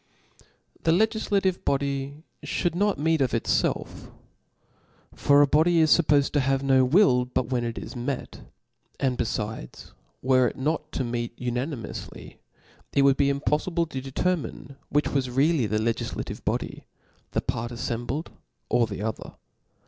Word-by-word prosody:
^ - - -24 0.4
The - - +1
legiflative 200 -1 +1
body 140 +1 -2 0.2
fhould 175 -3 -1
not 200 +1 +1
meet 160 +1 +1
of 125 -3 +1
it* 115 - -1
felf. - - -1 1.0
For 145 0 +5
g - - -10
body 165 +3 +4
is 155 -2 +6
fuppofed 145 -4 +3
to 145 - +2
have 135 0 +1
no 135 -1 +4
will 130 -2 +4
but 125 -1 -2
when 125 -2 +1
it 115 -1 -4
is - - -7
met; 125 +2 -4 0.6
and 130 -2 +1
befides, 110 - -4 0.3
were 130 -1 +4
it - - -5
not 155 +2 -2
to - - -1
meet 120 -1 -3
unanimoufly, 125 +1 -5 0.6
it 140 - +4
would 140 -1 +5
be 140 0 +3
impoffibic 155 +4 0
to 130 - -4
determine 140 -1 -2
which 145 +1 +1
was 135 -2 0
really 135 0 +2
the 105 +1 0
legiflative 115 +1 -3
body - - 0
j - - -13 0.5
the - - +1
part 120 +1 -3
affembled, 120 +5 -3 0.4
or 120 -1 +3
the 100 -1 -5
other. 110 0 -5
135 Hz, 155 wpm, -26 LUFS, 120-155 Hz, 1.0 s, is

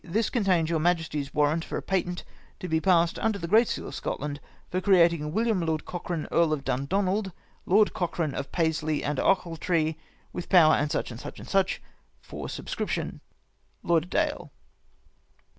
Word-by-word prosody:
— - - -39
This 225 - +1
contains 190 -9 +2
your 165 -1 0
Ma 175 +3 +4
jesty's 150 -4 -5
warrant 150 +2 +1
for - - -4
a - - -3
patent 180 -2 -1 0.4
to 185 - -5
be 160 -1 +1
passed 170 -2 +3
under 220 -2 0
the 170 - -5
great 220 +6 +5
seal - - -4
of - - -10
Scotland, 145 0 -4 0.3
for 185 - 0
creating 170 -6 +4
William 220 0 +1
Lord 160 -2 -1
Cochrane 175 -2 -4
Earl 165 -2 +3
of 140 -3 -3
Dundonald, 190 +10 0 0.4
Lord 205 +3 +4
Cochrane 170 -4 -2
of 140 - -5
Paisley 155 -3 0
and 145 -2 -1
Ochiltree, 165 -3 +1 0.4
with 175 - -6
power, 160 -5 +6
&c. - - 0
&c. 120 -1 -8
&c. 195 -1 +3 0.6
For - - -8
subscription. - - -4 0.3
" - - -42
Lauderdaill." 180 - 0
170 Hz, 160 wpm, -27 LUFS, 155-190 Hz, 0.6 s, power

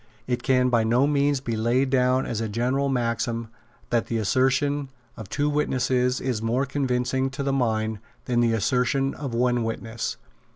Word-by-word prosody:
It 125 -1 -1
can 125 -1 +3
by 120 -2 +3
no 120 +4 +3
means 145 -1 +1
be 115 -4 -3
laid 120 +4 +1
down 130 0 +2
as 115 -2 -3
a 110 - -2
general 125 +6 0
maxim 115 -2 -1 0.4
that 120 -1 +1
the 115 - -1
assertion 130 +6 +1 0.3
of 110 -5 -9
two 145 +4 0
witnesses 130 -3 +1
is 125 -5 -2
more 120 +4 0
convincing 130 -1 0
to 135 +1 -5
the 135 0 0
mind 110 -4 0 0.3
than 120 -2 +1
the 115 -1 +3
assertion 125 +4 +1
of 135 -5 -5
one 120 0 +2
witness. 115 0 -4
125 Hz, 170 wpm, -25 LUFS, 115-135 Hz, 0.4 s, can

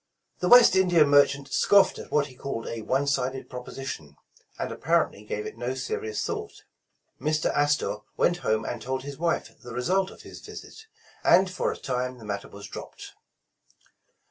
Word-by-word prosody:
The 180 - 0
West 245 -4 +8
India 175 -4 +5
merchant 140 -1 +3
scoffed 200 -1 +4
at - - -9
what 150 -1 +3
he 130 -3 -13
called 125 -3 -5
a 115 -1 -5
one 130 +6 0
sided 135 -1 -1
proposition, 125 - -7 0.4
and - - -3
apparently 100 - 0
gave 105 0 -4
it 115 - -8
no 125 +2 -2
serious 110 -4 -3
thought. - - -5 0.6
Mr. 155 +1 +1
Astor 145 -6 +1 0.2
went 175 - +3
home 110 -9 0
and 120 - -4
told 130 +3 -3
his 140 0 -8
wife 170 0 -1
the 120 -2 -9
result 185 +10 +1
of - - -14
his - - -10
visit, 445 - -11 0.4
and 190 0 +5
for 185 - -1
a - - -6
time 125 -1 -3
the 115 - -12
matter 100 -1 -4
was 100 0 -10
dropped. - - -9
135 Hz, 170 wpm, -26 LUFS, 120-155 Hz, 0.6 s, West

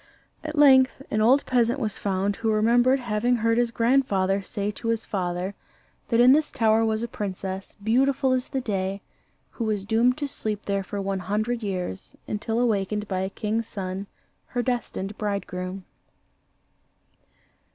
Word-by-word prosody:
At 310 0 -5
length 265 -2 +5
an 215 - +1
old 260 +6 +4
peasant 245 +1 +2
was 215 -5 -2
found 200 0 -1
who 225 -1 0
remembered 240 +5 +4
having 240 0 +1
heard 230 0 +2
his 240 -1 +2
grandfather 230 -6 +2
say 200 +1 -3
to 230 - -7
his 230 -1 0
father, 180 0 -2 0.6
that 230 - +2
in 245 +1 +8
this 300 +2 +3
tower 225 -2 +3
was 220 0 0
a - - -2
princess, 195 -2 -5
beautiful 260 +5 +2
as 255 0 0
the 270 -2 -2
day, 195 -3 -2 0.5
who 235 - -4
was 210 -3 -1
doomed 235 +4 +3
to 290 -2 -2
sleep 215 -6 -4
there 200 -1 0
for 200 +2 -5
one 195 0 -2
hundred 215 +5 -1
years, 180 - -4
until 225 +2 -2
awakened 210 -3 0
by 190 -2 -2
a 190 0 -1
king's 220 +2 -2
son, 190 0 -5 0.4
her 245 -1 -2
destined 225 -5 -3
bridegroom. 190 -2 -4
215 Hz, 160 wpm, -25 LUFS, 195-245 Hz, 0.6 s, in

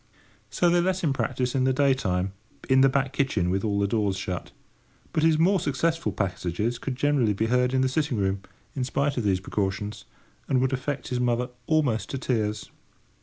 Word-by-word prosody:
So 175 - +1
they 175 0 +4
let 185 +1 0
him 145 -4 +2
practise 130 -2 -1
in 130 - +1
the 130 - +3
day 140 0 +4
time, 95 -6 -1 0.3
in 130 0 +5
the 135 - +6
back 135 0 0
kitchen 110 -12 +1
with 95 +1 0
all 100 -2 0
the 100 - +2
doors 100 -2 0
shut; 90 -2 -4 0.6
but 155 - +1
his 160 0 +4
more 185 +4 +3
successful 165 +3 0
passages 100 +4 -2
could 135 - -4
generally 135 -6 +2
be 110 +3 0
heard 125 0 +3
in 130 0 +2
the 130 - +3
sitting 140 -2 0
room, 95 -1 0 0.3
in 130 - -1
spite 140 +2 0
of 120 - 0
these 95 -3 +2
precautions, 100 +2 -3 0.4
and 130 - +2
would 130 +1 +1
affect 135 +2 -3
his 125 -2 -1
mother 125 0 0 0.2
almost 145 -9 +1
to 135 - -3
tears. 110 -5 -2
125 Hz, 200 wpm, -26 LUFS, 105-140 Hz, 0.6 s, the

